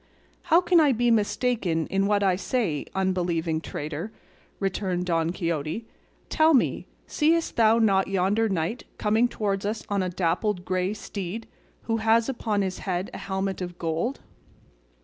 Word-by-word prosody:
"How 335 +3 +6
can 355 -1 +4
I 295 -4 +5
be 240 +1 +2
mistaken 210 -6 +1
in 195 +1 0
what 205 -1 +2
I 190 -2 +3
say, 195 - -1
unbelieving 175 -4 0
traitor?" 155 +7 -5 0.5
returned 190 -2 -1
Don 165 -2 +1
Quixote; 170 +3 -3 0.4
"tell 315 0 +4
me, 255 - +1 0.2
seest 330 +2 +1
thou 225 0 +5
not 195 -4 +3
yonder 195 +4 +1
knight 185 +5 -2
coming 220 +3 +2
towards 200 -4 -2
us 215 +2 -3
on 200 -1 +1
a 185 - -1
dappled 180 +2 -1
grey 185 +2 -1
steed, 200 +1 -6 0.4
who 225 0 0
has 225 +1 +3
upon 220 -6 -1
his 185 -1 -3
head 185 0 -3
a - - -6
helmet 190 -1 -3
of 175 -1 -5
gold?" 170 +11 -2
195 Hz, 150 wpm, -26 LUFS, 180-225 Hz, 0.5 s, How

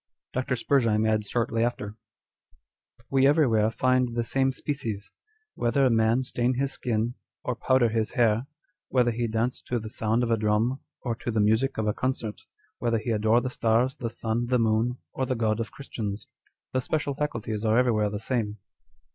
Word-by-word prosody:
Dr. 130 0 0
Spurzheim 115 -4 +2
adds 110 -2 +1
shortly 115 -1 0
after 120 -4 -1
â€" - - -10 0.6
" 115 - -34
We 135 0 +5
everywhere 120 -8 +4
find 125 0 +1
the 120 - +1
same 135 +3 +1
species; 115 -8 -4 0.4
whether 130 +3 +2
man 115 +3 +3
stain 125 0 0
his 135 +2 0
skin, 115 -1 -1 0.3
or 125 - -1
powder 130 0 +3
his 110 -1 0
hair; 115 +1 +2 0.4
whether 125 -2 +3
he 115 +1 -1
dance 115 +3 -1
to 125 - 0
the 110 -1 -6
sound 115 +2 +1
of 115 - 0
a 115 - +3
drum 110 +5 +1 0.2
or 120 - -1
to - - -5
the 110 -2 0
music 110 +6 +2
of 110 - 0
a 105 - +1
concert; 120 -4 -3 0.4
whether 115 -1 +1
he 110 +2 -2
adore 110 +2 +3
the 130 - -3
stars, 120 +3 +2
the 115 - -3
sun, 115 +1 -2
the 125 +1 +3
moon, 115 +2 +1 0.2
or 130 - -1
the 130 - 0
God 110 -1 0
of 115 - -3
Christians. 110 -6 -5 0.5
The 130 - +1
special 145 +1 -1
faculties 115 -7 -3
are 110 0 +3
everywhere 110 -4 +3
the 105 0 -4
same." 110 -2 -2
115 Hz, 185 wpm, -27 LUFS, 110-125 Hz, 0.6 s, We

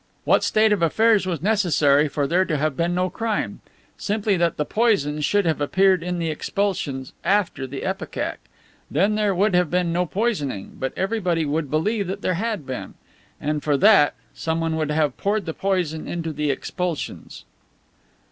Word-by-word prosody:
What - - +3
state 215 0 +3
of 200 - -1
affairs 210 +4 +3
was 170 -3 -3
necessary 155 -8 +3
for 145 0 -1
there 175 +6 +2
to 155 -4 -1
have 150 -1 0
been 170 +3 0
no 180 +1 +1
crime? 220 +3 -3 0.4
Simply 210 -1 0
that 170 -1 +1
the 150 - 0
poison 150 -11 +1
should 205 +6 +2
have 160 -3 0
appeared 190 +4 +3
in 180 +1 -3
the 165 -2 -1
expulsions 155 -7 -2
after 185 -9 +1
the 135 +1 -6
ipecac. 190 +1 -3 0.5
Then 205 +2 +2
there 210 -2 +1
would 200 +2 +2
have 180 -2 +3
been 175 -1 0
no 180 +1 0
poisoning, 150 - -2
but 130 - -2
everyone 180 -7 0
would 155 -2 -1
believe 200 - 0
there 185 - 0
had 205 -3 -2
been. 130 -1 -6 0.4
And, 150 0 -2
for 145 -2 +2
that, 195 -5 +5 0.2
someone 165 0 -1
would 155 -2 -1
have 150 -3 0
poured 205 -1 0
the 160 - -3
poison 180 -5 -1
into 165 -2 -3
the 150 0 -1
expulsions." 170 +4 -4
175 Hz, 170 wpm, -23 LUFS, 150-200 Hz, 0.5 s, that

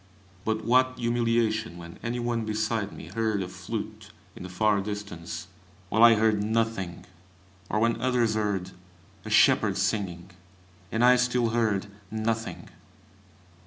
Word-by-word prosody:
But 110 0 -1
what 130 +1 +3
humiliation 115 -4 0
when 85 0 -10
any 120 +1 -3
one 120 -1 -1
beside 110 -1 -1
me - - -10
heard 110 -3 -1
a - - -5
flute 105 +3 -6 0.3
in - - -10
the 90 - -7
far 100 +2 +2
distance, 90 -5 -6 0.4
while 110 +4 +3
I 115 -1 +9
heard 110 -1 +2
nothing, 110 -6 -1 0.6
or - - 0
when 115 +1 +1
others 125 -3 +2
heard 100 -4 -1 0.5
a - - -5
shepherd 105 -3 +4
singing, 95 -2 -2 0.6
and 115 +2 +3
I 125 0 +7
still 125 -1 +1
heard 110 -4 +1 0.2
nothing! 110 +1 -3
110 Hz, 135 wpm, -27 LUFS, 100-115 Hz, 0.6 s, I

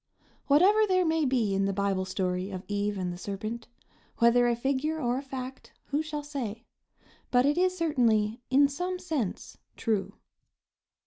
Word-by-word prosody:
Whatever 395 +9 +5
there 370 -2 +3
may 320 -1 +2
be 240 -6 +1
in 195 0 +1
the 195 - 0
Bible 195 -1 0
story 185 0 -2
of 185 -2 -6
Eve 205 0 -1
and 180 -2 -2
the 175 - -9
serpent, 215 +4 -5 0.5
whether 240 +1 +5
a 240 - +2
figure 275 +6 -1
or 245 -2 0
a - - -5
fact, 265 -1 -8 0.2
who 290 +2 +1
shall 305 -2 -5
say? 245 -6 -5 0.6
but 245 +1 +4
it 290 +1 +3
is 365 +1 +1
certainly, 235 -9 +1
in 280 +2 +5
some 360 +6 -3
sense, 305 - -4 0.2
true. 215 -4 -1
245 Hz, 165 wpm, -28 LUFS, 205-295 Hz, 0.6 s, Whatever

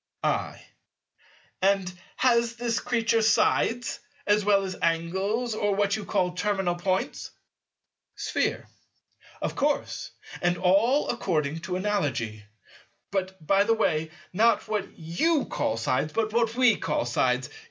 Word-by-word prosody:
I. - - -1 1.0
And 190 -1 +2 0.2
has 235 -2 +2
this 235 -1 -1
Creature 230 -1 +1
sides, 230 +2 +2 0.3
as 210 0 +3
well 200 -1 +3
as 185 -1 -4
Angles 190 +8 0
or 205 -2 0
what 200 0 +2
you 215 -2 -5
call 180 -1 +1
"terminal 190 -1 0
Points"? 185 +2 -2 0.9
Sphere. - - -1 0.8
Of - - -2
course; 290 0 -1 0.3
and 175 0 +1
all 205 +11 +3
according 160 -9 -1
to 175 +2 -4
Analogy. 145 - -1 0.7
But, 190 -3 -3
by 195 +4 +4
the 225 +2 +2
way, 160 -7 0 0.2
not 225 +5 +3
what 210 -2 -3
you 260 - +1
call 110 - -1
sides, 130 +6 0
but 220 -1 -1
what 230 -1 +1
we 250 -2 +4
call - - -1
sides. - - 0
200 Hz, 130 wpm, -26 LUFS, 175-225 Hz, 1.0 s, by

